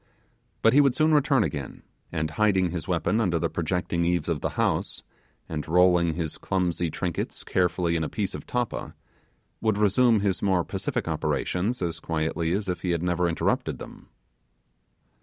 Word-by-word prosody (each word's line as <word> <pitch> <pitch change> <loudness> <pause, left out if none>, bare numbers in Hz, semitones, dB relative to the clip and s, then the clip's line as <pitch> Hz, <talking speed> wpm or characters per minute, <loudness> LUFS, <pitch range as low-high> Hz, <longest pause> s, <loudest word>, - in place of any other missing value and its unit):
But 115 - +6
he 145 - +7
would 140 -3 +3
soon 155 0 +3
return 140 -4 +4
again, 70 -8 -5 0.3
and 80 0 -2
hiding 95 0 +2
his 85 0 -5
weapon 95 +5 +1
under 90 -6 +1
the 85 0 -1
projecting 85 0 -1
eaves 85 -2 0
of 80 -4 -1
the - - -1
house, - - 0 0.4
and 80 -1 -4
rolling 85 -1 +4
his 80 -3 -3
clumsy 90 -2 -1
trinkets 85 +2 -3
carefully 90 -2 +1
in 80 - 0
a 75 - -2
piece 100 -3 -2
of - - -8
tappa, 125 -2 -3 0.7
would 110 -2 +1
resume 105 +2 +4
his 100 -2 0
more 95 -3 +2
pacific - - -3
operations 100 +5 -1
as 80 -2 -2
quietly 80 +1 -1
as 100 +2 -1
if 90 -1 -2
he 90 - -2
had 85 -1 0
never 90 0 +1
interrupted 85 - 0
them. - - -11
90 Hz, 170 wpm, -26 LUFS, 85-105 Hz, 0.7 s, he